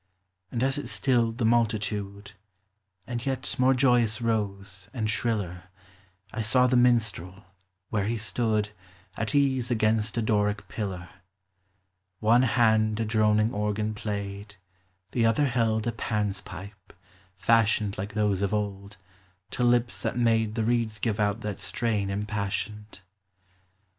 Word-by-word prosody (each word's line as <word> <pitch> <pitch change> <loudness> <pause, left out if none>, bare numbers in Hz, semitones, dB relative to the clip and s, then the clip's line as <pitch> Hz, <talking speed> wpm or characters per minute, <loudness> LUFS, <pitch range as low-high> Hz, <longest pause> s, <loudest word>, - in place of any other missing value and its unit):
And 120 0 -1
as 135 +2 +1
it - - -6
stilled 120 -4 +1
the 120 - 0
multitude, 105 -3 0 0.7
And 120 0 -4
yet 135 -1 -2
more 130 +1 +4
joyous 125 -4 +3
rose, 100 -4 -3
and 110 -3 -1
shriller, 100 -5 -2 0.7
I 110 - -2
saw 125 +4 +4
the 125 0 +2
minstrel, 110 -6 +1 0.5
where 105 -3 0
he 115 +2 -1
stood 110 0 0 0.4
At 115 +7 -2
ease 130 -4 +2
against 110 -1 +1
a 115 - +1
Doric 105 -2 0
pillar: 95 -4 -5 1.1
One 115 +3 +4
hand 110 -3 +3
a 115 - 0
droning 110 +1 +2
organ 105 +1 -1
played, 100 -1 -5 0.6
The 115 -2 +2
other 115 +6 +2
held 115 -4 +1
a 120 - 0
Pan's 105 -3 -2
pipe 95 +1 -11 0.4
(fashioned 110 0 +2
Like 100 +2 -5
those 105 -3 +1
of 100 +1 0
old) 100 -1 -4 0.5
to 125 - -1
lips 120 0 +2
that - - -2
made 115 -2 +2
The 115 - 0
reeds 115 -2 0
give 110 0 -1
out 105 +1 0
that 105 -3 -4
strain 105 -5 -1
impassioned. 105 +1 -4
110 Hz, 135 wpm, -27 LUFS, 105-115 Hz, 1.1 s, more